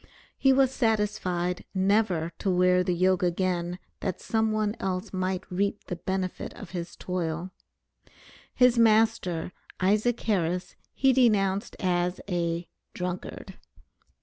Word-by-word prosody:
He 270 - +4
was 265 -1 +4
satisfied 210 -7 0
never 190 -4 +2
to 200 - -1
wear 180 0 +4
the 180 0 0
yoke 185 +1 +2
again 175 0 0 0.2
that 190 -3 -3
some 220 -1 0
one 215 0 0
else 185 -1 -3
might 185 0 -1
reap 200 +3 -1
the 180 - -5
benefit 185 +1 -3
of 200 - -10
his 170 -2 -5
toil. 175 0 -3 1.0
His 250 -1 +5
master, 215 -7 +3 0.3
Isaac 215 +5 +2
Harris, 180 -3 -1 0.2
he 265 -1 +4
denounced 205 -5 +2
as 180 -1 0
a 170 -2 -1 0.3
"drunkard." 180 +1 -5
185 Hz, 120 wpm, -27 LUFS, 180-215 Hz, 1.0 s, His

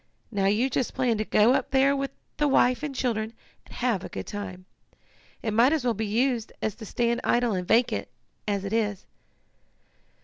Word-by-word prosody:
Now 200 -3 0
you 215 +6 +3
just 260 -1 -2
plan 245 -4 +1
to - - +1
go 215 +4 +4
up - - 0
there 275 +1 +4
with 275 0 -2 0.3
the 295 - +2
wife 255 -2 +3
and 295 -2 -4
children, 225 -3 -1 0.3
and - - -13
have 235 -7 0
a - - -6
good - - -6
time. 185 -3 -6 0.8
It 220 - -1
might 240 +7 +5
as 310 -5 0
well 240 - +2
be 220 0 -3
used 235 +1 0
as 220 - -1
to 220 -3 -9
stand 235 +3 0
idle 240 -2 +2
and 180 -2 -3
vacant, 225 - +2 0.4
as 200 -1 -1
it 200 - -3
is." 210 -4 -1
230 Hz, 195 wpm, -26 LUFS, 210-255 Hz, 0.8 s, might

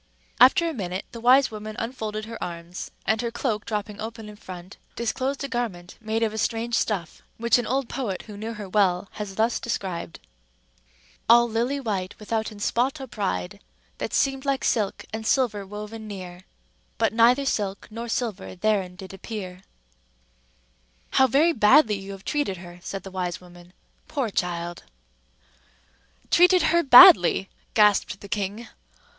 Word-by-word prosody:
After 265 +7 +6
a 330 - -2
minute, 190 -6 -4
the 230 -1 -9
wise 255 +2 +5
woman 215 0 -7
unfolded 220 -3 -4
her 230 +1 -7
arms; 170 0 -7 0.2
and 220 +2 +1
her 235 - -2
cloak 230 -3 -2
dropping 210 -1 -4
open 225 -1 -7
in 210 - -11
front, 185 -2 -10 0.2
disclosed 260 +4 -2
a - - -2
garment 215 -9 -4
made 220 +1 -1
of 220 -1 0
a 220 - -4
strange 230 +2 -1
stuff, 195 -8 -1 0.2
which 235 +2 +3
an 240 - -3
old 265 +1 0
poet 220 -9 -4
who 210 - -10
knew 220 +3 -5
her 210 -2 -7
well 190 -1 +1
has 205 -2 -7
thus 225 +3 +1
described:— 185 - -4 1.1
"All 235 +1 +7
lilly 240 +5 -1
white, 200 -7 -3
withoutten 220 -1 -3
spot 255 +7 0
or 265 - -6
pride, 90 - -3 0.4
That - - -3
seemd 270 -1 +1
like 275 -1 -1
silke 210 -4 0
and 220 0 -4
silver 220 -4 0
woven 210 +2 -8
neare; 185 -3 -9 0.5
But - - +1
neither 240 +4 +4
silke 200 -6 -2
nor 230 +2 -6
silver 225 -6 -3
therein 190 -2 0
did 190 0 -10
appeare." 190 -2 -7 1.5
"How 265 - +5
very 300 +7 +3
badly 215 -2 +5
you 195 +1 -8
have 195 0 -12
treated 290 -11 -1
her!" 175 0 -11
said 195 +1 -6
the 195 - -9
wise 180 -2 -3
woman. 175 0 -16 0.4
"Poor 260 -7 -2
child!" 175 -2 -3 1.5
"Treated 360 +1 +5
her 340 - +5
badly?" 195 - +8 0.3
gasped 210 -2 +3
the 200 - -9
king. 205 +3 -3
215 Hz, 160 wpm, -25 LUFS, 190-235 Hz, 1.5 s, badly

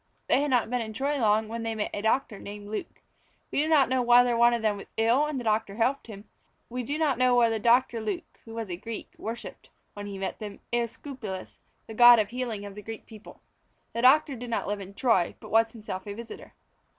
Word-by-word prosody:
They - - +3
had 290 - 0
not 245 -3 +1
been 250 -1 0
in 220 -1 -5
Troy 280 +5 -1
long 215 -1 +2
when 230 +1 -5
they 225 0 -3
met 210 - -2
a 205 - -3
doctor 220 -1 0
named 205 0 -9
Luke. 215 - -6 0.5
We - - +1
do 310 - 0
not 300 -5 +5
know 255 0 +1
whether 245 0 +5
one 235 +1 +5
of 235 -1 -1
them 210 -2 +1
was 200 - -10
ill 235 +7 +3
and 300 -3 -3
the - - -6
doctor 215 -2 0
helped 245 +5 0
him; 205 -2 -10 0.4
we 250 +1 -3
do 285 +5 -3
not 290 -6 +1
know 255 -1 +4
whether 230 -2 +3
Doctor 235 +1 +3
Luke 210 -4 -5
(who 225 -1 -10
was 225 -2 -4
a 175 - -3
Greek) 230 +4 -7
worshipped, 230 +2 -7 0.2
when 205 0 -7
he 200 -1 -6
met 190 0 -4
them, 210 -2 -7
Æsculapius, 235 -4 -4 0.3
the 220 - -9
god 240 +1 +9
of 210 -2 +1
healing 235 -5 -4
of 200 - -8
the 210 - -9
Greek 225 +1 -8
people. 220 -2 -14 0.5
The 235 - -2
doctor 280 +3 +5
did 245 0 -7
not 230 - -1
live 205 0 -2
in 195 +1 -10
Troy, 225 -9 +2
but - - -12
was 225 +1 +4
himself 210 -4 -7
a 200 - -5
visitor. 230 0 -10
230 Hz, 235 wpm, -27 LUFS, 210-245 Hz, 0.5 s, god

